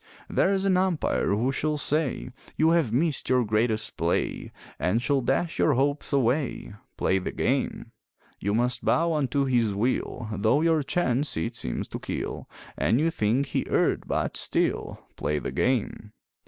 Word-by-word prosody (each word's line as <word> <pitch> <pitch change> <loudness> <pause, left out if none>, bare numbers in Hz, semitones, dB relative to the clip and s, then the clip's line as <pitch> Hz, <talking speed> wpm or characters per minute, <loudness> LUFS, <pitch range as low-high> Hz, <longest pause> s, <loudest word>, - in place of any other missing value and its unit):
There's 195 0 +1
an 190 -2 +3
umpire 185 -4 0
who 115 +6 +1
shall 150 +2 -1
say 150 -3 0 0.3
You 160 +1 +4
have 165 -9 +2
missed 145 +4 0
your 125 -2 +3
greatest 110 +1 0
play, 85 +1 -1 0.3
And 95 +6 +1
shall 135 +2 +1
dash 135 +7 -1
your 150 - +4
hopes 140 +3 0
away 135 -3 0 0.2
Play 95 - +2
the 90 - -4
game! - - -1 0.5
You 100 +2 -1
must 120 +2 +1
bow 165 +1 +2
unto 140 -2 0
his 120 -6 +1
will 120 +1 -1
Though 110 +8 +2
your 165 -1 +3
chance 140 -2 0
it 115 +1 -2
seems - - -3
to - - -5
kill, - - -5 0.3
And 120 - +2
you 165 +2 +2
think 115 +2 +1
he - - 0
erred, - - +1
but - - -1
still - - -1
Play 75 - -1
the - - -4
game! 110 -4 -1
130 Hz, 160 wpm, -26 LUFS, 110-155 Hz, 0.5 s, You